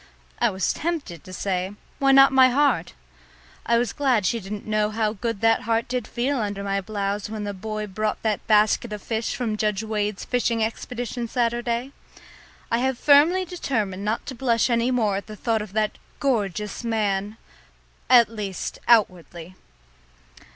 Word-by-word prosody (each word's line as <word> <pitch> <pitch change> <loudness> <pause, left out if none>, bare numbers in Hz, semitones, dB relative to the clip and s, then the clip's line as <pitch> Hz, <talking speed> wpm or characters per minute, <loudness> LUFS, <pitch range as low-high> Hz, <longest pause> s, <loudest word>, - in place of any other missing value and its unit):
I - - +3
was 190 -1 -1
tempted 310 - -4
to 185 - -12
say, 185 +1 -2 0.2
"Why 275 -1 +4
not 270 0 +7
my 260 -1 +7
heart?" 285 +3 +1 0.7
I 235 - +4
was 235 -3 0
glad 255 -8 +1
she 230 - +1
didn't 205 +1 -7
know 215 -1 +1
how 215 0 -1
good 230 0 -4
that 225 0 +3
heart 230 +1 0
did 250 -2 -3
feel 260 +3 -1
under 205 -2 -3
my 195 0 -1
blouse 200 0 -3
when 215 -1 -5
the 205 0 -3
boy 215 +2 -4
brought 215 +2 -3
that 215 -2 -1
basket 215 +1 +3
of 210 - -7
fish 225 0 -2
from 225 -4 -2
Judge 210 0 0
Wade's 210 -2 -2
fishing 235 -2 0
expedition 240 +1 -4
Saturday. 240 +2 -1 0.8
I 230 - +2
have 260 0 0
firmly 305 +8 +5
determined 220 - -3
not 215 +2 -2
to 270 - -6
blush 240 -1 +1
any 235 +1 +2
more 220 -6 +1
at 200 - -7
the 215 - -8
thought 220 +1 0
of 210 -2 -8
that 215 -1 -1 0.2
gorgeous 210 -5 -1
man 210 -2 -1 0.7
at 240 -2 +7
least 205 -4 -5
outwardly. 180 -6 +1
220 Hz, 165 wpm, -24 LUFS, 205-240 Hz, 0.8 s, not